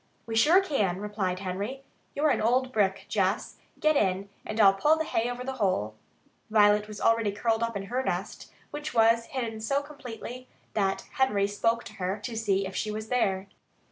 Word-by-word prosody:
"We 225 - -4
sure 315 +12 +6
can," 210 - 0
replied 200 -3 -2
Henry. 200 +8 -4 0.3
"You're 295 +1 +3
an - - +1
old 255 +3 +2
brick, 195 -3 +1
Jess. 195 0 0 0.2
Get 310 0 +3
in, 195 -4 +1 0.2
and 215 - -4
I'll 195 -2 +7
pull 295 +11 +3
the 320 - 0
hay 235 -5 0
over 245 0 -5
the 265 - -3
hole." 110 - +1 0.6
Violet 210 -1 +4
was 210 -1 -8
already 230 -2 +2
curled 225 +2 0
up 230 -2 -1
in 195 - -5
her 245 +6 -2
nest, - - -4 0.2
which 295 -3 -5
was 230 0 +4
hidden 230 -5 -4
so 275 +6 0
completely 255 -3 -9 0.3
that 195 -2 0 0.2
Henry 210 -7 +3
spoke 230 +3 0
to 205 - -10
her 185 +3 -1
to 235 - -4
see 200 -3 +1
if 190 0 -7
she 215 - -1
were 215 +1 -3
there. 205 -5 0
220 Hz, 190 wpm, -28 LUFS, 200-250 Hz, 0.6 s, I'll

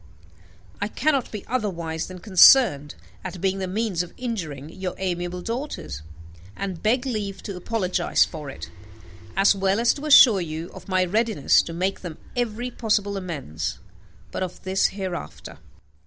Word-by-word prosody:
I - - +1
cannot 285 -5 0
be 210 -3 -6
otherwise 170 -9 -2
than 185 - -9
concerned 180 - +6 0.3
at 185 -1 -6
being 195 +1 0
the 190 - -2
means 200 -2 -1
of 175 - -8
injuring 165 - -4
your 185 +1 -5
amiable 175 -1 -3
daughters, 230 - -5 0.5
and 190 -4 -5
beg 245 +4 +2
leave 205 -6 -3
to 200 - -5
apologize 185 0 +1
for 150 -4 -8
it, 85 -10 -9 0.7
as 195 +1 +6
well 195 +1 +1
as 235 0 +4
to 295 +1 -6
assure 235 -9 +8
you 160 0 -5
of - - -12
my 185 -1 +2
readiness 215 -4 +3
to 165 - -7
make 185 +3 -1
them 170 -4 -7 0.2
every 240 0 -2
possible 210 -4 0
amends; 145 - -4 0.5
but - - -4
of 185 -1 -5
this 190 +1 +2
hereafter. 190 - -6
190 Hz, 155 wpm, -24 LUFS, 175-220 Hz, 0.7 s, assure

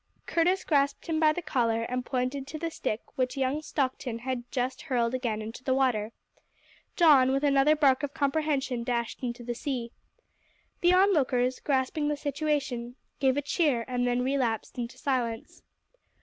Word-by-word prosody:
Curtis 355 +3 +1
grasped 280 -2 +1
him 320 -2 -1
by 310 -1 +5
the 350 +3 -4
collar 230 -5 0
and 250 +2 -2
pointed 260 +2 -2
to 310 - -6
the 330 +1 -3
stick 215 -7 -3 0.2
which 255 +2 0
young 270 +3 0
Stockton 260 -5 -2
had 245 0 -5
just 255 0 -2
hurled 245 -5 0
again 235 -4 -2
into 225 +3 -8
the 260 0 +1
water. 235 -5 +1 0.8
Don, 285 -7 +6
with 275 +2 0
another 285 +1 +4
bark 280 -3 +3
of 290 -2 -3
comprehension, 280 -4 0
dashed 235 -1 -2
into 240 -1 -4
the 240 0 -3
sea. 240 -2 -4 0.9
The 350 +1 +4
onlookers, 265 -10 +3
grasping 280 +2 0
the 295 0 0
situation, 280 -5 -2 0.2
gave 265 -1 +2
a 290 - 0
cheer 285 -6 +1
and 245 -1 0
then 245 0 +1
relapsed 255 -4 -1
into 235 0 -5
silence. 240 -5 -2
260 Hz, 165 wpm, -28 LUFS, 245-290 Hz, 0.9 s, Don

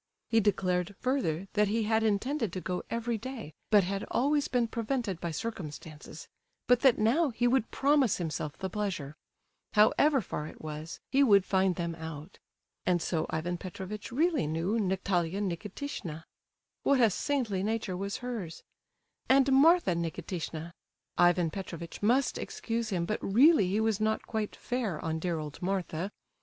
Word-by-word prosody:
He 225 - +4
declared, 190 -2 0
further, 195 - -1
that 210 -1 +3
he 220 +2 0
had 220 +1 +2
intended 225 - 0
to 185 - -3
go 180 0 -3
every 230 -1 -2
day, 230 - -7 0.2
but 205 -2 +6
had 195 +2 -2
always 285 +3 +2
been 245 -2 +1
prevented 230 -5 -2
by 170 - -2
circumstances; 155 -5 -7 0.4
but 245 0 +4
that 265 -3 +5
now 270 +9 +3
he 245 0 +1
would 245 -2 +2
promise 275 -5 +3
himself 155 -3 -4
the 190 - -3
pleasure—however 210 - 0
far 150 -5 -5
it - - -12
was, 155 +1 -7
he 275 - +4
would 200 -8 +6
find 190 -1 +2
them 170 -1 -2
out. 160 +1 -8 0.4
And 180 -1 +2
so 160 -1 -1
Ivan 170 +2 -2
Petrovitch 190 +4 -7
really 305 - +1
knew 170 +8 0
Natalia 190 -2 0
Nikitishna!—what 200 - -4
a 230 -4 +5
saintly 230 -5 -1
nature 215 -2 -1
was 200 +2 -3
hers!—and 250 +5 -2
Martha 320 - +5
Nikitishna! 170 0 -4 0.5
Ivan 175 -2 +4
Petrovitch 170 -3 -7
must 245 +6 +2
excuse 230 -1 -3
him, 175 -4 -1
but 215 - -2
really 235 - +5
he 200 +4 0
was 220 -2 +1
not 220 0 0
quite 220 -2 -3
fair 225 -10 -2
on 160 0 -1
dear 170 0 -1
old 150 -2 -7
Martha. 185 -1 -2
200 Hz, 150 wpm, -30 LUFS, 170-235 Hz, 0.5 s, but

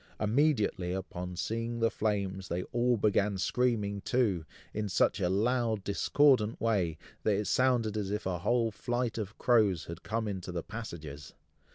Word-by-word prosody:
Immediately 110 - +1
upon 90 -1 -5
seeing 115 +5 -2
the 115 0 +2
flames, 100 -3 -1
they 90 +1 -2
all 120 0 +2
began 105 -1 +2
screaming 105 -2 0
too, 105 -9 +1 0.3
in 105 -1 -2
such 90 - +2
a 90 -2 +1
loud 110 +1 +1
discordant 115 +2 +3
way, 95 -8 +1 0.2
that 105 - +2
it 105 +2 -1
sounded 120 -4 +2
as 105 -3 -2
if 105 +2 -3
a 90 -2 -1
whole 115 +4 +1
flight 120 +1 -2
of 105 0 -5
crows 105 -9 +3
had 85 +1 -8
come 110 0 -2
into 95 -3 -4
the 85 -2 -3
passages. 80 -10 -8
105 Hz, 160 wpm, -31 LUFS, 95-115 Hz, 0.3 s, discordant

